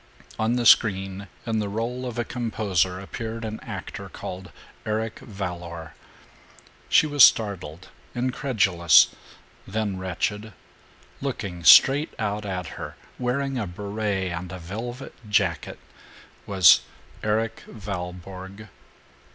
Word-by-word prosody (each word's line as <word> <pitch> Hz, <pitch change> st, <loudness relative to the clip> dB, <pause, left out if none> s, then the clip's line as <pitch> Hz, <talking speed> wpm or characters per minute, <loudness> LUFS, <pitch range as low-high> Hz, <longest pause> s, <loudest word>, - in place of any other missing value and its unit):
On 110 Hz, +2 st, +1 dB
the 120 Hz, -1 st, 0 dB
screen, 95 Hz, -3 st, +4 dB, 0.2 s
in 110 Hz, -2 st, 0 dB
the 105 Hz, -1 st, -2 dB
role 120 Hz, +4 st, -3 dB
of 120 Hz, -1 st, -6 dB
a 120 Hz, -, +1 dB
composer, 100 Hz, -7 st, -1 dB
appeared 115 Hz, +3 st, -6 dB
an 110 Hz, 0 st, -5 dB
actor -, -, -7 dB
called 90 Hz, -2 st, -8 dB, 0.3 s
Eric 110 Hz, +1 st, -2 dB
Valour. 90 Hz, -5 st, -6 dB, 1.0 s
She -, -, +6 dB
was 145 Hz, -3 st, +5 dB
startled, 95 Hz, -6 st, +3 dB, 0.3 s
incredulous, 120 Hz, -, +3 dB, 0.5 s
then 105 Hz, -2 st, -2 dB
wretched. 105 Hz, +4 st, -3 dB, 0.7 s
Looking 100 Hz, -10 st, -4 dB
straight 140 Hz, -, +7 dB
out 105 Hz, -1 st, -2 dB
at 90 Hz, -2 st, -3 dB, 0.2 s
her, -, -, -6 dB, 0.2 s
wearing 130 Hz, +1 st, -1 dB
a 105 Hz, -, -2 dB
beret 100 Hz, 0 st, -3 dB
and 85 Hz, +1 st, -5 dB
a 95 Hz, -, -6 dB
velvet 115 Hz, +9 st, -7 dB, 0.2 s
jacket, 95 Hz, -5 st, 0 dB, 0.7 s
was 95 Hz, -6 st, +7 dB, 0.4 s
Erik 110 Hz, +1 st, -1 dB
Valborg. 95 Hz, 0 st, -7 dB
105 Hz, 110 wpm, -25 LUFS, 95-115 Hz, 1.0 s, straight